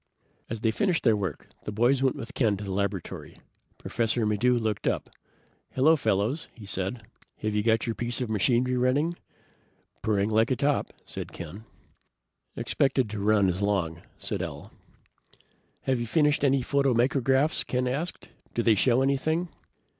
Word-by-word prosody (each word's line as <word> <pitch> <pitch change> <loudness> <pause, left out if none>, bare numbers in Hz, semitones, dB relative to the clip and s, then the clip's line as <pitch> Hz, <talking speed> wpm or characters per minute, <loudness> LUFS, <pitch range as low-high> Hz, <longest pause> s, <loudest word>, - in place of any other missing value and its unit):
As 115 -1 -4
they 110 - +2
finished 180 - +1
their 115 -4 +5
work 95 -7 -4 0.2
the - - -3
boys 120 +5 +2
went 135 -1 +2
with 115 - -7
Ken 110 -6 +2
to 105 - -7
the 100 - -5
laboratory. 100 -2 -3 0.4
Professor 115 0 0
Maddox 105 +2 0
looked 110 -3 -2
up. - - -1 0.6
"Hello, 155 +5 +5
Fellows," 110 +2 0
he 110 - -11
said. 95 +4 -3 0.3
"Have 110 0 -2
you 105 - +2
got 115 +1 +2
your 115 - -1
piece 120 +1 -2
of 125 - -1
machinery 120 +4 +2
running?" 140 +7 +2 0.9
"Purring 105 0 +1
like 110 +2 +3
a 130 - +2
top," 140 +4 0
said - - -7
Ken. 85 +6 -8 0.9
"Expected 130 -5 +1
to 105 - -4
run 105 0 +3
about 90 -2 +2
as - - -3
long," 90 -5 0 0.2
said - - -3
Al. - - -6 1.1
"Have 130 -2 0
you 120 - -3
finished 150 +2 +2
any 135 -2 +3
photomicrographs?" 135 +2 +2
Ken 125 0 -1
asked. 150 +7 -3 0.3
"Do 120 - +1
they 115 - +5
show 125 +5 +3
anything?" 155 +6 0
120 Hz, 160 wpm, -27 LUFS, 105-135 Hz, 1.1 s, their